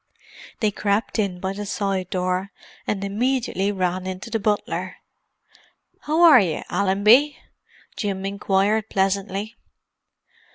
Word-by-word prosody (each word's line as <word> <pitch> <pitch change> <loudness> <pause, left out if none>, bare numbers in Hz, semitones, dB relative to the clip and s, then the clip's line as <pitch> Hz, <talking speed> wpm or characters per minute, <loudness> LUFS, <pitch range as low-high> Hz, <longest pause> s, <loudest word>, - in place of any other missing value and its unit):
They 215 -2 +2
crept 205 +3 -1
in 195 -4 -1
by 190 +1 -2
a 205 +1 -5
side 195 -2 -2
door, 185 +1 -2 0.4
and 200 -2 -2
immediately 210 -1 0
ran 185 -1 -2
into 190 +5 -6
the 225 - 0
butler. 210 0 -2 1.0
"How 315 +3 +1
are 310 -7 +9
you, 170 -5 -2
Allenby?" 205 +10 +4 0.6
Jim 195 -3 -3
inquired 200 +2 0
pleasantly. 195 +3 -1
200 Hz, 115 wpm, -23 LUFS, 190-215 Hz, 1.0 s, are